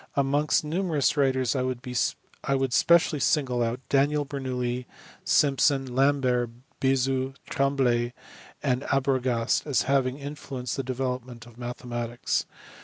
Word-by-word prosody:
Amongst 145 +3 +2
numerous 160 -3 +1
writers 130 -3 +2
I 130 - +1 0.9
would 135 -2 0
specially 170 0 +4
single 130 -5 +1
out 120 +2 -1
Daniel 145 +1 +2
Bernoulli, 125 -3 -3 0.4
Simpson, 135 -2 +2
Lambert, 130 -3 +2 0.3
Bezout, 135 0 +1
Trembley, 125 -4 +1 0.5
and 130 -2 +1
Arbogast 130 -2 +1
as 135 -6 +2
having 135 -1 +1
influenced 140 -3 -5
the 135 - -1
development 125 -2 -4
of 120 -2 -15
mathematics. 120 -1 -3
130 Hz, 105 wpm, -26 LUFS, 125-140 Hz, 0.9 s, specially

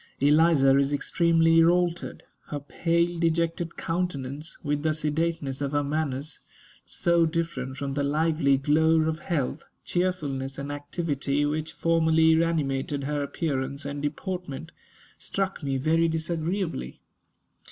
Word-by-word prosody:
Eliza 145 -1 +5
is 140 0 +1
extremely 165 +2 +3
altered. 175 0 +1 0.2
Her 145 - -4
pale, 170 +4 0
dejected 165 0 0
countenance, 155 -4 -3
with 145 -1 -1
the 155 0 +1
sedateness 155 -2 -1
of 140 0 -2
her 145 0 +2
manners, 145 -1 -2 0.5
so 170 -1 +2
different 155 -6 -3
from 140 0 -3
the 145 - -1
lively 150 -1 +2
glow 160 +3 +3
of 155 0 -1
health, 155 -8 -2 0.2
cheerfulness, 145 -7 -2
and 140 +1 -5
activity 145 -1 -1
which 155 +1 -2
formerly 160 -1 +3
animated 140 -3 -1
her 145 +1 -1
appearance 140 -1 -2
and 140 0 -4
deportment, 165 0 -4 0.5
struck 195 -1 -2
me 135 -2 -1
very 160 +4 +2
disagreeably. 160 - -2
155 Hz, 120 wpm, -26 LUFS, 140-165 Hz, 0.5 s, Eliza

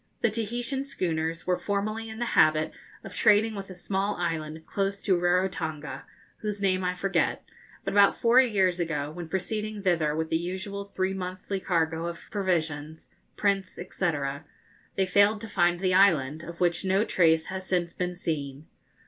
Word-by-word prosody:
The 235 - +3
Tahitian 240 +5 -1
schooners 165 - -2
were 180 - +2
formerly 215 +2 -2
in 220 - -8
the 240 - -1
habit 155 0 +4 0.3
of - - -9
trading 220 0 +4
with 195 -2 -7
a 185 - -8
small 195 +3 -1
island 160 -2 -3
close 200 0 -1
to 190 - +3
Rarotonga, 175 -6 -1 0.3
whose 210 -1 -4
name 190 -2 +1
I 180 0 0
forget; 195 +1 0 0.4
but - - -3
about 200 0 +5
four 240 +2 +6
years 190 -7 +2
ago, 150 -4 -2
when 170 0 -7
proceeding 210 +3 -3
thither 165 -5 +2
with 160 0 -2
the 160 - +2
usual 190 +3 -4
three 190 -1 -2
monthly 185 +1 -4
cargo 165 -2 0
of 170 0 -8
provisions, 160 -6 -2 0.3
prints, 195 -2 +1
&c., 180 0 -1 0.8
they 190 - +2
failed 200 +3 +4
to 225 - -6
find 175 -3 +2
the 185 -1 +1
island, 160 -6 +4
of 170 0 -9
which 175 0 +2
no 195 +3 +2
trace 160 -5 +3
has 190 0 -5
since 175 -2 0
been 180 0 -3
seen. 150 -4 -4
185 Hz, 165 wpm, -27 LUFS, 165-200 Hz, 0.8 s, four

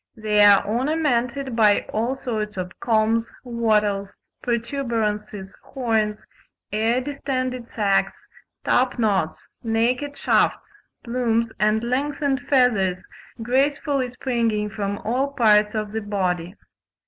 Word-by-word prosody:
They 210 -1 +3
are 205 -1 +6
ornamented 255 0 0
by 210 -3 +4
all 235 +5 0
sorts 215 -6 -4
of 185 0 -6
combs, 225 0 +1
wattles, 210 -4 0 0.3
protuberances, 225 -5 -2
horns, 220 -5 -1 0.5
air 225 +4 +1
distended 255 -3 -3
sacks, 200 -3 +1 0.5
top 255 +1 +2
knots, 200 -8 0
naked 245 +5 0
shafts, - - +1 0.3
plumes 235 -2 0
and 215 +1 +2
lengthened 275 +2 -1
feathers 220 -9 +3 0.5
gracefully 270 +1 +1
springing 230 -4 -1
from 200 -1 -3
all 265 +5 0
parts 215 -4 +4
of 215 -1 -2
the 220 +1 -3
body. 185 -3 -2
230 Hz, 105 wpm, -23 LUFS, 210-255 Hz, 0.5 s, are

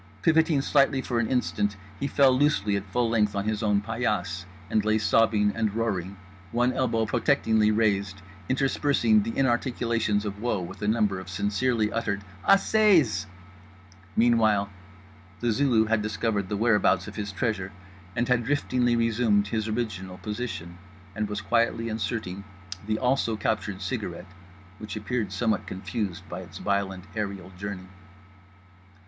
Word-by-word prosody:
Pivoting 160 -3 +3
slightly 140 -2 +3
for 120 -2 -1
an 110 - +1
instant 105 -5 0 0.2
he 140 - -1
fell 140 -2 +4
loosely 110 -8 +2
at 100 0 -3
full 120 +5 0
length 105 -3 +1
on 100 0 -1
his 110 0 -1
own 105 -2 +2
paillasse, 105 -5 -2 0.2
and 105 +1 +1
lay 110 +1 +2
sobbing 105 -1 +3
and 110 -2 -1
roaring, 100 -4 -2 0.3
one 120 +2 +2
elbow 115 -4 +1
protectingly 110 -3 +2
raised, 100 -3 0 0.3
interspersing 145 - +2
the 230 +2 -4
inarticulations 115 -4 +1
of 100 0 -5
woe 120 -4 0
with 90 +3 -8
a 105 - -1
number 105 -3 +1
of 95 0 -9
sincerely 105 +4 0
uttered 105 -3 -2 0.2
Assez!'s. 190 - +4 0.9
Meanwhile 110 -4 +3 0.7
The 120 -1 +1
Zulu 115 -2 +3
had 110 0 +1
discovered 105 -2 -1
the 105 - -1
whereabouts 105 -4 +3
of 105 - -8
his 100 -1 -4
treasure, 95 -2 -2 0.4
had 120 - +1
driftingly 125 -1 +1
resumed 110 -3 +2
his 110 0 -1
original 105 -5 -3
position; 100 -4 -5 0.4
and 105 0 -2
was 105 -1 -3
quietly 115 +2 +1
inserting 110 -3 -3 0.4
the 110 0 0
also 125 -2 +1
captured - - -2
cigarette 90 - -5 0.5
which 105 - -6
appeared 110 -1 -2
somewhat 110 +3 0
confused 95 0 -4
by - - -6
its - - -10
violent 100 -2 -1
aerial 100 -4 -4
journey. 95 -1 -6
110 Hz, 140 wpm, -26 LUFS, 100-120 Hz, 0.9 s, fell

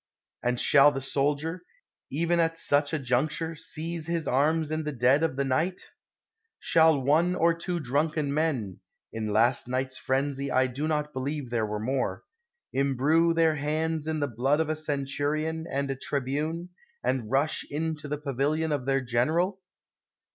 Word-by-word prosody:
And 125 0 0
shall 145 0 +6
the 135 - -3
soldier, 145 +5 -1 0.5
even 170 +4 +1
at 165 0 +1
such 145 -2 +2
a 160 - 0
juncture, 150 +5 0
seize 165 0 -5
his 170 -3 -1
arms 155 +4 +2
in 155 0 -1
the 150 - -3
dead 130 +2 +3
of 165 -5 0
the 140 +1 0
night? 155 +8 -1 0.7
Shall 160 -3 +4
one 160 +7 +2
or 170 -1 +3
two 170 +1 -3
drunken 145 +1 0
men 140 - -1 0.3
(in 110 -1 -3
last 120 +4 +3
night's 130 +1 -2
frenzy 140 +1 -1
I 130 +1 +3
do 130 +4 -3
not 150 -1 -1
believe 135 0 -4
there 115 -3 0
were 105 0 -3
more) 130 +4 -2 0.5
imbrue 140 +5 +2
their 160 -2 +3
hands 155 +2 -1
in 160 -1 -1
the 145 - +1
blood 135 +5 +1
of 160 -1 0
a 155 - 0
centurion 155 +2 -2
and 140 0 -1
a - - -2
tribune, 150 +6 -2 0.3
and 120 -5 -1
rush 140 +4 +1
into 155 0 -3
the 150 +1 -2
pavilion 150 +3 -1
of 140 -3 -2
their 135 0 +2
gen 120 -1 +1
eral? 180 +5 0
145 Hz, 165 wpm, -27 LUFS, 135-160 Hz, 0.7 s, shall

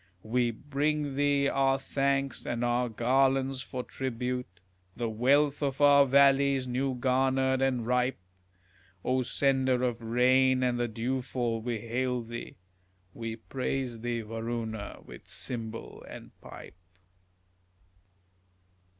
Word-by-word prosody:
We 120 +2 +1
bring 145 +4 -2
thee 140 0 +2
our 135 -1 +2
thanks 135 -2 -1
and 120 0 -2
our 120 0 +1
garlands 130 +3 +1
for 130 -1 -5
tribute, 125 -5 -4 0.4
The 120 - -2
wealth 140 +6 +2
of 135 -2 -1
our 140 -1 +6
valleys, 140 0 +4
new 130 +1 -1
garnered 130 +1 +1
and 130 -3 +1
ripe; 125 +2 +1 0.9
O 130 0 +2
sender 130 0 +1
of 120 -2 -1
rain 130 +3 +3
and 125 -1 +1
the 120 - +1
dewfall, 120 0 -2
we 115 -2 -3
hail 125 +1 -1
thee, 120 +1 -8 0.6
We 115 -1 -5
praise 125 0 -3
thee, 120 0 -2
Varuna, 115 -1 -5
with - - -12
cymbal 115 -2 -6
and - - -10
pipe. 90 - -12
125 Hz, 115 wpm, -29 LUFS, 120-135 Hz, 0.9 s, our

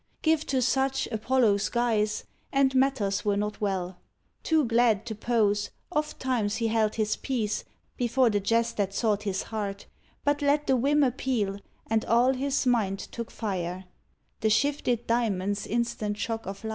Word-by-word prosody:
Give 320 -1 +2
to 260 -2 +1
such 265 +2 +1
Apollo's 220 -3 +2
guise, 220 -3 0 0.3
and 275 -1 +3
matters 260 -7 +1
were 205 -1 +1
not 210 +1 -3
well. 190 -3 -2 0.4
Too 315 -3 +2
glad 230 -2 +3
to 230 - -4
pose, 210 -2 +1 0.2
ofttimes 260 -9 -1
he 230 -1 0
held 220 -1 +1
his 215 -1 0
peace 225 -6 -2 0.3
Before 245 -1 +2
the 205 - +1
jest 230 +3 +1
that 195 -1 -1
sought 210 -3 +1
his 200 -2 -2
heart; 200 -3 -4 0.4
but 290 0 +1
let 290 +1 +2
The 265 - +3
whim 285 +4 +3
appeal, 240 -6 0 0.3
and 220 0 +1
all 240 +3 +4
his 275 +1 -1
mind 220 -6 +2
took 230 +3 -7
fire 185 -3 -4 0.3
— - - -45
The 220 - +2
shifted 240 0 +1
diamond's 205 -4 0
instant 225 -3 -1
shock 225 0 -3
of 195 +2 -6
light. 220 - -3
225 Hz, 160 wpm, -27 LUFS, 205-260 Hz, 0.4 s, all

